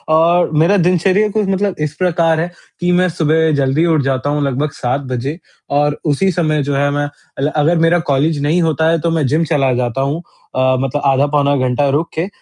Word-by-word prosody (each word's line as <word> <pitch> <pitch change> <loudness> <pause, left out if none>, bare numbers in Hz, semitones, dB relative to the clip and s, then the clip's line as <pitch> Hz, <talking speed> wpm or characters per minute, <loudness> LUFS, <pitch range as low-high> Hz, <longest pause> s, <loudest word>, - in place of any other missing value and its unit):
और 170 +1 +3
मेरा 195 +5 +3
दिनचर्या 185 +4 +2
कुछ 210 -1 -1
मतलब 195 0 0
इस 150 - -12
प्रकार 165 -3 +1
है, 175 +2 -2 0.3
कि 180 0 0
मैं 180 0 +2
सुबह 160 0 +1
जल्दी 140 +4 +1
उठ 160 -3 +2
जाता 135 +1 -1
हूँ 145 0 0
लगभग 140 +2 -1
7 125 +3 -2
बजे 135 +6 -3 0.4
और 145 0 +1
उसी 160 +6 +1
समय 155 -3 0
जो 140 0 -2
है 140 +1 +1
मैं 145 0 -1 0.5
अगर 160 +3 +2
मेरा 165 +2 +3
कॉलेज 145 +3 +1
नहीं 160 +5 +1
होता 160 -1 +1
है 165 0 +1
तो 170 - 0
मैं 160 -3 0
जिम 155 +5 +1
चला 135 -5 +1
जाता 125 +1 -1
हूँ 145 +5 -2 0.3
अ, 130 0 +2
मतलब 135 +2 -2
आधा 135 +1 +3
पौना 145 -1 +1
घंटा 140 +3 0
रुक 150 +5 0
के। 165 +4 -2
155 Hz, 210 wpm, -16 LUFS, 140-170 Hz, 0.5 s, और